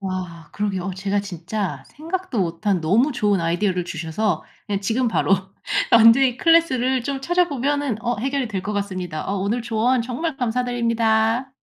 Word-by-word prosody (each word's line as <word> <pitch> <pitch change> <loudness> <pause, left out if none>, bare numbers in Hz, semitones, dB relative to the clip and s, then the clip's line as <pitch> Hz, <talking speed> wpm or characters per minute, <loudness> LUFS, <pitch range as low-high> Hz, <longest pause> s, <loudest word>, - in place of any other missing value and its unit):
와. 180 -5 -5
그러게요. 200 -3 -2
어 190 -1 -3
제가 195 +2 -1
진짜 195 +1 -4
생각도 330 - -4
못 170 +2 -3
한 195 -4 +2
너무 225 - +2
좋은 205 -5 +1
아이디어를 180 +2 0
주셔서 165 +2 -2 0.2
그냥 200 -2 -2
지금 230 +5 0
바로 220 - +1 0.6
원데이 235 +3 +6
클래스를 265 -6 +3
좀 275 +2 -3
찾아보면은 290 - 0
어 240 0 -1
해결이 270 +1 -1
될 190 -3 -3
것 210 - -3
같습니다. 185 -6 -3
어 200 - -1
오늘 210 +5 -1
조언 235 +2 +1
정말 270 +5 -3
감사드립니다. 235 0 0
220 Hz, 355 characters per minute, -22 LUFS, 190-255 Hz, 0.6 s, 원데이